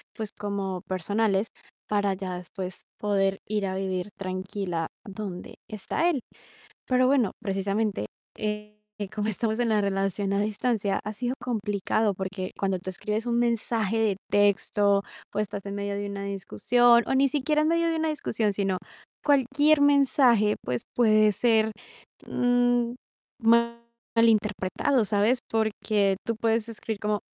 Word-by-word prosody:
pues, 220 -2 -4
como 200 -3 -3
personales, 200 +3 0 0.4
para 205 -1 +1
ya 185 -1 -5
después 185 +1 -7
poder 195 -2 +1
ir 210 -2 0
a 190 - -3
vivir 190 0 -2
tranquila 185 -3 -3 0.2
donde 195 -3 -7
está 215 - 0
él. 290 -7 0 0.7
Pero 255 0 +3
bueno, 255 -6 +3
precisamente, 200 - -1 0.3
eh, 210 0 -4 0.3
como 210 -1 -1
estamos 220 +1 -1
en 235 -2 +1
la 215 -1 +3
relación 195 0 -1
a 200 - +1
distancia, 210 -1 0
ha 210 - -3
sido 245 +3 -2
complicado, 210 -2 0
porque 190 0 -4
cuando 195 -2 0
tú 185 +1 -6
escribes 210 +4 -3
un 235 -1 +1
mensaje 230 -2 +1
de 215 -3 +2
texto, 205 0 +3 0.3
pues 210 - 0
estás 200 0 -7
en 200 - -4
medio 200 0 -3
de 205 0 -3
una 200 0 -5
discusión 235 - +3
o - - 0
ni 275 +1 +4
siquiera 300 +3 +1
en 310 - +2
medio 335 0 +2
de 330 - 0
una 320 0 0
discusión, 225 -8 -1
sino 195 -1 0 0.5
cualquier 285 +2 +4
mensaje, 265 -7 +4
pues, 125 -1 -2
puede 215 -3 +5
ser, 220 0 +2 0.5
mm, 245 -1 +2 1.2
malinterpretado, 220 +2 +2
¿sabes? 210 +5 +2
Porque 215 -2 +1
tú 230 - -1
puedes 225 0 +1
escribir 220 -1 -5
como: 210 0 0
210 Hz, 145 wpm, -26 LUFS, 195-235 Hz, 1.2 s, puede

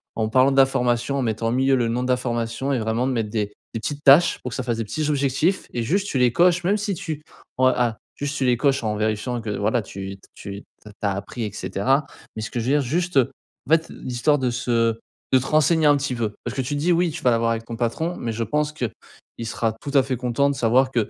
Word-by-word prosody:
en 110 -1 -1
parlant 130 +4 +4
de 135 - -1
la 135 - +8
formation. 125 +1 0
En - - 0
mettant, 115 -1 -1
au - - -1
milieu, 135 +2 +3
le 120 -2 +1
nom 120 +2 -1
de 125 - -3
la 125 - +3
formation 120 +2 -2
et - - +1
vraiment 110 +3 0
de 135 - 0
mettre 115 -3 -1
des 105 -2 -1 0.2
des 115 - -3
petites 145 +6 -4
tâches 150 +5 +6
pour 125 - -3
que - - -5
ça - - -2
fasse 120 -2 -1
des 115 - -1
petits 150 +8 -2
objectifs 145 +6 +1
et 120 - -1
juste 195 - 0
tu 140 - -2
les 125 -1 +4
coches, 180 +2 +4
même 200 +4 +2
si 205 -1 -2
tu 155 -3 -5 0.3
en 130 - +3
ah! 120 -3 +1 0.2
Juste 145 +1 -3
tu 135 - 0
les 125 -1 +4
coches, 135 0 +1
en 105 -1 -1
vérifiant 110 +3 -1
que, 110 - -6
voilà, 110 +4 +1
tu 95 -1 -7 0.2
tu 100 +1 -8 0.2
tu - - -30 0.2
as 100 - +1
appris, 100 +4 -5
et 105 - -4
cetera. 135 +9 0 0.3
Mais, 110 - -4
ce - - -5
que 120 - -2
je 115 - -3
veux 130 - +1
dire, 145 - +3
juste 175 +6 -1
heu, 130 -1 +4 0.4
en - - -6
fait, 165 0 +3
l'histoire 130 +4 0
de 125 -2 0
se 115 -2 0 0.3
de 130 - +7
te 130 - -5
renseigner 155 +1 +3
un 145 0 +5
petit 140 -2 -2
peu. 110 -3 -2
Parce - - -5
que 135 - 0
tu 130 +3 -3
te - - -2
dis: 170 +5 +2
«Oui 175 +1 +2
tu 160 +1 -7
vas 125 - +4
l'avoir 115 0 +2
avec 115 0 -3
ton 115 - -6
patron» 160 +9 -1
mais 115 - -3
je 115 +1 -2
pense 150 +6 -1
que, 140 -5 -2 0.5
il 115 - -4
sera 115 0 -1
tout - - -6
à 135 - +6
fait 130 -1 -2
content 125 +3 +1
de - - -4
savoir 130 +2 +3
que 115 -5 0
125 Hz, 280 wpm, -23 LUFS, 115-145 Hz, 0.5 s, la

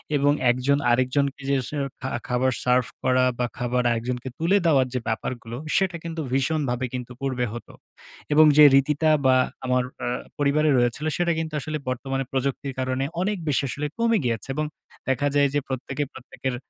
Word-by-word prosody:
এবং 145 0 +3 0.2
১ 120 - +3
জন 140 0 +4
আরেকজনকে 135 +3 +1
যে, 140 - +3
স - - -5 0.3
খা 130 - -3 0.2
খাবার 125 +1 +1
সার্ভ 125 -1 +3 0.2
করা, 130 0 +3
বা 125 - +2
খাবার 125 0 0
আরেকজনকে 125 +2 -3
তুলে 180 +5 +3
দেওয়ার 135 -5 +4
যে, 125 - 0
ব্যাপারগুলো, 115 +1 -4 0.2
সেটা 190 -4 +2
কিন্তু 165 -1 -4
ভীষণভাবে 135 -2 0
কিন্তু 125 -1 -5
পূর্বে 130 -2 -1
হতো। 120 - -9 0.6
এবং 155 +1 +7
যে, 150 - +10
রীতিটা, 150 +3 +3 0.2
বা 130 0 +6 0.3
আমার 125 0 +2 0.2
আ - - -1 0.3
পরিবারে 150 +2 +2
রয়েছিল, 120 +5 +1
সেটা 175 -1 +1
কিন্তু 160 -1 -4
আসলে 155 +3 -4
বর্তমানে 135 +1 -2
প্রযুক্তি 135 +1 -2
কারণে 130 +1 -1 0.2
অনেক 205 +1 0
বেশি 140 -1 +1
আসলে 145 +5 -3
কমে 230 -1 +3
গিয়েছে। 115 -2 -2
এবং 155 0 -1 0.4
দেখা 135 +2 +1
যায় 145 0 +5
যে, 145 - +2
প্রত্যেকে, 135 +2 -3
প্রত্যেকের 130 0 -5
135 Hz, 170 wpm, -24 LUFS, 125-150 Hz, 0.6 s, যে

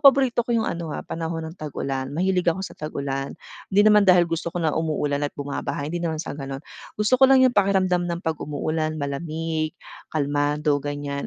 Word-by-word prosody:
paborito 270 -3 +6
ko 235 0 0
yung 225 - +1
ano, 170 -1 -3
ah, - - -6
panahon 165 0 -4
ng - - -17
tag-ulan 135 -3 -3
mahilig 180 0 +2
ako 170 +3 +1
sa - - -7
tag-ulan. 140 -2 -3 0.4
Di 205 - +7
naman 210 -1 +6
dahil 180 -1 +7
gusto 165 0 -2
ko 175 - -1
na 160 - +2
umuulan 150 -2 0
at - - -9
bumabaha 145 0 -3
hindi 175 - -2
naman 165 -2 -2
sa - - -6
ganon. 135 -1 -6 0.3
Gusto 210 +4 +2
ko 265 - +8
lang 265 -1 +6
yung 260 - +6
pakiramdam 190 -4 +2
ng 170 0 -3
pag 160 -4 -1
umuulan 155 +1 -2
malamig, 155 +2 -3 0.4
kalmado 145 0 +1
ganyan. 145 0 -4
160 Hz, 190 wpm, -24 LUFS, 145-185 Hz, 0.4 s, ko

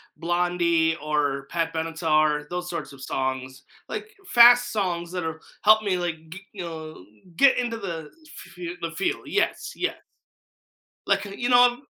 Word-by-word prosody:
Blondie 170 -1 +1
or 145 -3 -1
Pat 165 -1 -1
Benatar, 155 -2 +1
those 180 0 -4
sorts 170 -5 -5
of 135 - -14
songs, 130 0 -3 0.3
like, - - -5 0.2
fast 240 0 +7
songs 175 -5 -2
that 180 -2 -3
have 160 0 -4 0.3
helped 215 +1 +6
me 195 -3 0
like 175 -2 -2
g 180 - -8
you 195 - -7
know, 160 - -8 0.3
get 275 -1 +5
into 235 -2 -1
the 165 -7 -6 0.2
f - - -13
f 175 0 -5
the 165 0 -3
field, 195 - -1
yes, - - -1
yes. - - -2 1.1
Like, - - +2
you 205 +5 -3
know, 245 0 +6
170 Hz, 155 wpm, -25 LUFS, 160-195 Hz, 1.1 s, fast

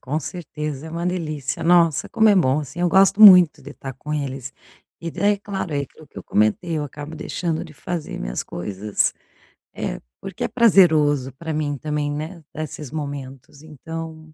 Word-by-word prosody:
com 145 +4 -2
certeza. 150 -2 -6
É - - -8
uma 170 +2 -3
delícia, 155 -6 -3
nossa, 170 -3 +3
como 220 -2 +3
é 205 - +6
bom, 140 -7 +3
assim, 150 +4 -7
eu 175 - +3
gosto 195 +3 +4
muito 180 -6 +9
de 140 - -10
estar 135 -1 -8
com 150 +5 -7
eles. 135 -3 -4 0.5
E 170 - -4
daí, 205 +1 +2
é - - -6
claro, 195 -5 -5
é 140 - 0
aquilo 155 +3 -13
que - - -11
eu - - -10
comentei, 130 - +1
eu 150 - -1
acabo 145 +2 -8
deixando 165 +1 -3
de 160 - -12
fazer 165 +1 -5
minhas - - -3
coisas, 100 +3 -2 0.6
eh, - - -4 0.2
porque 195 -2 -6
é - - +1
prazeroso 155 - +4
para 160 +4 -5
mim 150 -2 -2
também, 150 +1 -2
né, 155 +3 -6
desses 150 -3 -6
momentos, 140 -2 -7
então 160 +1 -8
155 Hz, 185 wpm, -22 LUFS, 140-170 Hz, 0.6 s, muito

